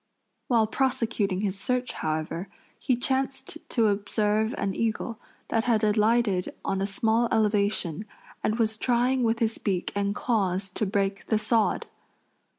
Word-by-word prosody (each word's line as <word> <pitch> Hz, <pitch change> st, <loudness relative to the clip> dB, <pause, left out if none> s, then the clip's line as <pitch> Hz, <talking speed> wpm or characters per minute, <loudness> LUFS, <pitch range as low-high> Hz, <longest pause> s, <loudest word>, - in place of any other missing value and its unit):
While 230 Hz, -3 st, +4 dB
prosecuting 220 Hz, -6 st, 0 dB
his 200 Hz, -2 st, -2 dB
search, 250 Hz, 0 st, -1 dB
however, 155 Hz, +4 st, -3 dB, 0.3 s
he 255 Hz, -, +1 dB
chanced 270 Hz, +4 st, -1 dB
to 230 Hz, -3 st, +2 dB
observe 210 Hz, +2 st, +1 dB
an 195 Hz, -, -1 dB
eagle 230 Hz, +1 st, -2 dB, 0.3 s
that 225 Hz, 0 st, +1 dB
had 230 Hz, -3 st, +2 dB
alighted 210 Hz, -2 st, +2 dB
on 195 Hz, 0 st, 0 dB
a 195 Hz, -, 0 dB
small 225 Hz, +4 st, +1 dB
elevation 205 Hz, -4 st, +1 dB, 0.4 s
and 215 Hz, -, +1 dB
was 220 Hz, -2 st, +1 dB
trying 250 Hz, +2 st, +2 dB
with 230 Hz, -1 st, +2 dB
his 225 Hz, -1 st, -1 dB
beak 185 Hz, -4 st, -1 dB
and 200 Hz, 0 st, -1 dB
claws 195 Hz, -5 st, 0 dB
to 215 Hz, -, -2 dB
break 195 Hz, 0 st, -1 dB
the 220 Hz, -, +2 dB
sod. 220 Hz, 0 st, +1 dB
215 Hz, 145 wpm, -27 LUFS, 200-235 Hz, 0.4 s, While